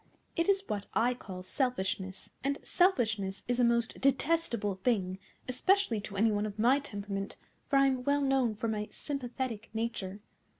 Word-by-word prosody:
It 335 +2 +1
is 390 0 +4
what 205 -1 -3
I 240 +3 +3
call 185 -7 -8
selfishness, 190 -5 -1
and 280 +1 +1
selfishness 220 - +2
is 245 0 0
a - - +5
most 235 -1 +2
detestable 270 -6 +2
thing, 190 -6 +1 0.3
especially 255 - +2
to 200 -1 -7
any 220 +2 +4
one 205 0 0
of 205 0 -7
my 245 +6 +5
temperament, 200 -6 -5 0.3
for 280 - +2
I 275 - +6
am 260 -2 +1
well 285 +2 +2
known 265 -5 +2
for 230 - -2
my 210 -1 -1
sympathetic 250 -5 -4
nature. 215 -4 -3
235 Hz, 165 wpm, -31 LUFS, 205-270 Hz, 0.3 s, I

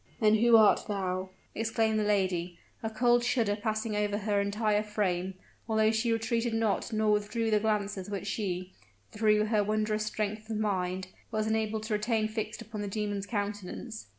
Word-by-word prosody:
"Then 215 -1 +4
who 235 +1 +6
art 215 -2 +5
thou?" 185 -2 -2 0.2
exclaimed 220 0 +1
the - - +1
lady, 185 -4 0 0.2
a 220 - -2
cold 240 +2 +3
shudder 230 -4 +1
passing 220 0 -2
over 205 0 0
her 205 -1 +1
entire 210 +1 +1
frame, 190 -3 -1 0.3
although 220 0 +3
she 225 +1 +1
retreated 230 +1 0
not 225 +1 0
nor 215 -1 +2
withdrew 210 +2 0
the 210 - +4
glances 205 -2 -1
which 200 -1 -4
she, 185 -3 -3 0.4
through 210 0 +3
her 215 -1 +2
wondrous 215 0 0
strength 215 +1 -3
of 220 - -2
mind, 185 -3 -1 0.2
was 215 -1 -1
enabled 220 0 0
to 220 0 -3
retain 215 +1 +1
fixed 220 0 -4
upon 215 -1 -6
the 205 - -3
demon's 205 -1 -3
countenance. 205 - -4
215 Hz, 170 wpm, -30 LUFS, 205-220 Hz, 0.4 s, who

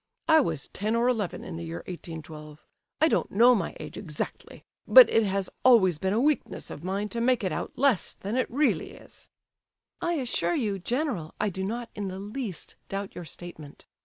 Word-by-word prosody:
I 320 -1 +7
was 160 - -2
ten 215 +4 -1
or 235 +1 +2
eleven 220 -7 -1
in 165 - -6
the 170 - -6
year 165 0 -6
1812. 155 -3 -9 0.4
I 315 - +6
don't - - +1
know 240 +5 +6
my 195 -8 -1
age 155 +2 -8
exactly, 150 -6 -6 0.2
but - - +10
it 225 - +4
has 195 -1 0 0.2
always 190 -11 +5
been 190 +2 0
a 215 - +2
weakness 295 +3 0
of - - -8
mine 195 +3 -2
to 235 - -3
make 245 -2 +2
it 185 - 0
out - - -4
less 265 -8 +2
than 205 +4 -4
it 255 - 0
really 285 +5 0
is." - - -15 0.7
"I 340 - 0
assure 280 +3 0
you, 210 -9 -1
general, 235 - -2
I 210 - +1
do 190 0 -4
not 230 +4 -4
in 205 -1 -4
the 185 0 -5
least 205 - -6
doubt 195 0 -4
your 175 - -7
statement. 155 -3 -10
200 Hz, 195 wpm, -27 LUFS, 175-245 Hz, 0.7 s, but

